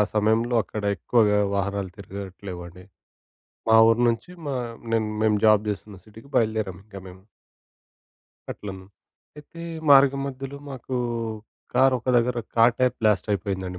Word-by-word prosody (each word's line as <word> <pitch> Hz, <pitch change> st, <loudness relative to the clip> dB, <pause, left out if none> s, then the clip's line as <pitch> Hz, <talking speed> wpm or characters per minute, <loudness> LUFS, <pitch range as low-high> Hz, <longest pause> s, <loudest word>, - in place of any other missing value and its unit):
సమయంలో 110 Hz, +3 st, +2 dB
అక్కడ 105 Hz, +2 st, -6 dB
ఎక్కువగా 105 Hz, +2 st, +2 dB, 0.2 s
వాహనాలు 100 Hz, -1 st, -2 dB
తిరగట్లేవండి. 95 Hz, -2 st, -9 dB, 0.9 s
మా 110 Hz, -, +7 dB
ఊరు 115 Hz, +1 st, +2 dB
నుంచి, 115 Hz, +6 st, -3 dB, 0.2 s
మా 140 Hz, -, -2 dB, 0.4 s
నేను 110 Hz, -1 st, +1 dB, 0.2 s
మేము 105 Hz, -1 st, +3 dB
జాబ్ 105 Hz, -1 st, +5 dB
జేస్తున్న 105 Hz, 0 st, -6 dB
సిటీకి 110 Hz, +5 st, -15 dB
బయలుదేరాము 110 Hz, -5 st, 0 dB
ఇంక 105 Hz, -2 st, -16 dB
మేము. 95 Hz, +1 st, -13 dB, 1.3 s
అట్లన్ 95 Hz, -2 st, -7 dB, 0.5 s
అయితే, 150 Hz, +3 st, -12 dB, 0.3 s
మార్గ 135 Hz, -1 st, +7 dB
మధ్యలో 135 Hz, +1 st, -6 dB
మాకూ 130 Hz, -1 st, -5 dB, 0.8 s
కారొక 130 Hz, -2 st, +3 dB
దగ్గర, 120 Hz, +1 st, +1 dB, 0.2 s
కార్ 115 Hz, +1 st, +5 dB
టైప్ 125 Hz, -1 st, +2 dB
బ్లాస్ట్ 105 Hz, -3 st, +2 dB
అయిపోయిందండి. 95 Hz, -2 st, -3 dB
110 Hz, 120 wpm, -24 LUFS, 100-120 Hz, 1.3 s, మా